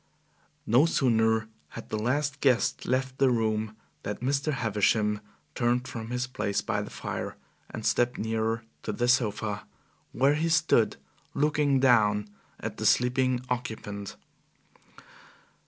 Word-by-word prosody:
No 130 +8 +5
sooner 110 -6 +2 0.2
had 115 - -9
the 110 - -2
last 145 +5 0
guest 130 -5 +1
left 130 +1 -1
the 135 -1 +5
room, 110 -2 0 0.3
than 105 - -3
Mr. 140 +4 0
Havisham 105 -3 +1 0.3
turned 125 +1 0
from 110 -1 -6
his 125 0 -1
place 100 -6 -2
by - - -1
the - - -6
fire, - - -5 0.3
and - - -7
stepped 120 +1 +2
nearer 110 +1 -1 0.2
the 115 +3 -1
sofa, 110 -4 0 0.4
where 135 +3 +3
he 160 +3 0
stood 160 -8 +3 0.4
looking 145 -1 +2
down 105 -5 +4 0.3
at - - -5
the - - -3
sleeping 125 0 +2
occupant. 110 -5 -4
120 Hz, 125 wpm, -28 LUFS, 110-130 Hz, 0.4 s, No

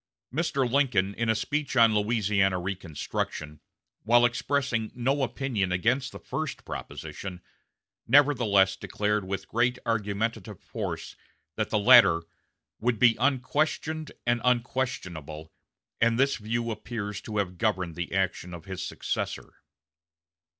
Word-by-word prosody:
Mr. 140 -4 0
Lincoln, 120 -8 +2
in 115 +2 -2
a 110 - +3
speech 145 +5 -2
on 115 -2 +6
Louisiana 105 -3 +2
reconstruction, 85 -4 -4 0.4
while 120 +2 +5
expressing 120 -2 0
no 135 +4 0
opinion 125 -8 -1
against 125 +8 +1
the - - -8
first 155 -2 -5
proposition, 95 -2 -7 0.7
nevertheless 120 -10 +4
declared 105 +2 -1
with 95 0 -4
great 125 +2 +1
argumentative 105 -2 -2
force - - -5 0.4
that - - -1
the - - +1
latter 105 -7 +7 0.6
"would 120 0 +1
be 120 0 +5
unquestioned 150 +4 0
and 120 0 +1
unquestionable"; 95 - -2 0.5
and 115 0 +3
this 140 +1 +3
view 115 +2 -2
appears 105 -2 -5
to 105 -1 -5
have 95 -3 -2
governed 95 -7 0
the 85 +1 -5
action 90 -2 -1
of 85 - -11
his 95 -2 -5
successor. - - -4
110 Hz, 120 wpm, -27 LUFS, 95-125 Hz, 0.7 s, latter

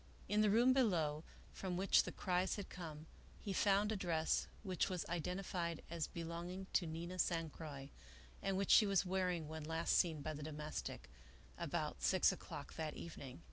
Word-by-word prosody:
In 210 +1 +3
the 215 - +5
room 240 +5 +6
below, 165 - +2 0.3
from 185 -2 -3
which 195 +2 +5
the - - -4
cries 180 0 0
had 200 -2 -6
come, 160 -4 -7 0.3
he 200 - -3
found 200 +2 +3
a - - +1
dress 165 -4 +1 0.2
which 185 -3 0
was 180 -2 -2
identified 175 0 -2
as 165 -3 -1
belong 170 +1 -5
ing 190 +1 -5
to 175 - +2
Nina 170 +3 -5
San 165 -3 +1
Croix 145 -4 -8 0.5
and 195 -1 0
which 195 0 +1
she 215 - +8
was 195 -1 +3
wearing 180 -3 0
when 160 0 -5
last 160 +2 +1
seen 160 -5 +2
by 155 - -2
the 150 - -7
domestic, 150 0 -5 0.5
about - - -2
six - - +4
o'clock - - -7
that 155 -2 -3
evening. 140 -5 -8
175 Hz, 180 wpm, -39 LUFS, 160-190 Hz, 0.5 s, she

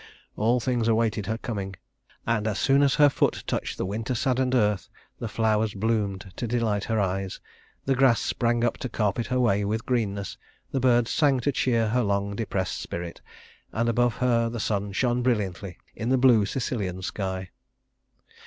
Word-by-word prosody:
All 115 +4 +2
things 120 -1 0
awaited 110 -3 +1
her 110 +1 -1
coming; 100 -5 -5 0.5
and 110 -2 0
as 105 -2 -1
soon 135 +1 +3
as 140 -1 +3
her 150 -1 +7
foot 140 - 0
touched - - -3
the - - -2
winter 110 +6 -3
saddened 130 +1 +1
earth 105 -5 +1 0.3
the 115 - -3
flowers 110 -1 +1
bloomed 100 -3 -1
to 120 - -2
delight 110 -4 0
her 110 -1 0
eyes, 95 -1 -2 0.5
the 135 - +2
grass 130 -3 +4
sprang 120 -1 0
up 120 - +1
to 130 - -4
carpet 105 +1 -1
her 125 -1 0
way 105 -5 +2
with 110 +3 -2
greenness, 100 -6 -2 0.3
the 135 - 0
birds 120 -2 +3
sang 140 -4 +3
to 145 - +1
cheer 115 -4 +1
her 125 +3 +2
long 100 -1 -1
depressed 100 -4 -2
spirit, 85 -1 -6 0.5
and 115 +2 0
above 120 0 +2
her 115 -2 +2
the 115 0 -5
sun 100 -1 -1
shone 120 +4 +1
brilliantly 100 -6 -1 0.2
in 115 +1 -3
the 130 - +4
blue 120 -6 +5
Sicilian 100 -8 -3
sky. 95 -1 -4
115 Hz, 175 wpm, -26 LUFS, 100-125 Hz, 0.5 s, her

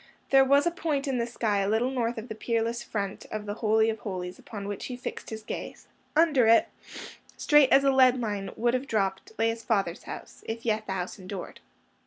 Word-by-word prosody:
There 270 0 +7
was 280 +3 +4
a 345 - +2
point 305 -4 -2
in 260 -3 0
the 235 - 0
sky 220 -4 0
a 195 0 0
little 230 +4 +1
north 240 -2 -1
of 220 +2 -6
the 220 - -5
peerless 230 +1 -1
front 200 -4 -4
of 215 -1 -4
the 205 - -3
Holy 220 0 +3
of 220 -1 -1
Holies 180 -3 -5
upon 200 -3 -7
which 205 -1 -5
he 250 - -6
fixed 250 - -6
his 220 -1 -7
gaze: - - -7 0.3
under 300 -7 +4
it, 230 0 +5 0.7
straight 295 -3 +5
as 275 - +6
a 275 - +4
leadline 245 -7 +3
would 235 +1 +2
have 255 +2 -1
dropped, 195 -4 -1
lay 225 0 +2
his 225 0 -3
father's 195 -6 -1
house, - - -9
if 225 +1 -5
yet 215 -1 0
the 190 - -2
house 185 +1 -4
endured. 185 0 -7
225 Hz, 215 wpm, -27 LUFS, 205-255 Hz, 0.7 s, There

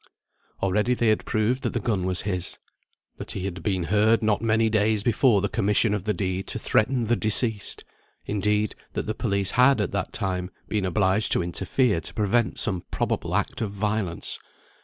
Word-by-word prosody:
Already 105 +6 +1
they 120 -2 +2
had 110 - +1
proved 115 +4 0
that - - -2
the 120 - 0
gun 100 -5 -1
was 90 -1 +2
his, 90 -3 -3 0.6
that - - -6
he 95 - -4
had 90 -2 -5
been 95 -1 -1
heard 105 +5 +2
not 110 -1 +1
many 115 0 +2
days 110 -1 +1
before 115 -2 +3
the 100 - 0
commission 105 +1 +2
of 100 -2 -3
the 105 - +1
deed 95 0 -3
to - - -2
threaten 120 +2 +1
the 120 +2 +2
deceased; 110 -1 -1 0.4
indeed, 105 +1 0 0.2
that - - -3
the - - -2
police 100 -1 0
had, 125 +2 +4
at 105 - -1
that - - -3
time, 90 -2 -3 0.2
been 105 -3 -1
obliged 95 +2 +2
to - - +1
interfere 95 +3 0
to - - -5
prevent 105 0 +1
some 90 -2 +5
probable - - -2
act - - -1
of 110 - -1
violence. 100 -3 -2
105 Hz, 185 wpm, -25 LUFS, 95-110 Hz, 0.6 s, some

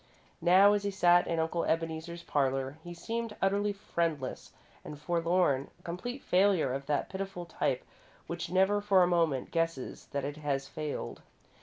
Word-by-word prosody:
Now, 190 +4 +6
as 205 - +1
he 200 - 0
sat 175 -2 +4
in 165 - -1
Uncle 165 +1 0
Ebeneezer's 165 +1 -2
parlour, 135 -2 0
he 175 - -8
seemed 225 +5 -4
utterly 200 +2 +1
friendless 165 -8 -3 0.3
and 150 - -8
forlorn 170 -3 +1
a - - -25
complete 245 +10 -5
failure 180 -7 +3
of 135 +1 -5
that 145 -1 0
pitiful 190 -2 -5
type - - -1 0.4
which 170 0 -5
never 190 +3 +3
for 195 -3 +5
a - - +3
moment 165 -7 +1
guesses 165 -5 -2
that 140 -1 -3
it 145 +1 -5
has 140 -2 -2
failed. 155 -2 -5
170 Hz, 160 wpm, -31 LUFS, 150-190 Hz, 0.4 s, Now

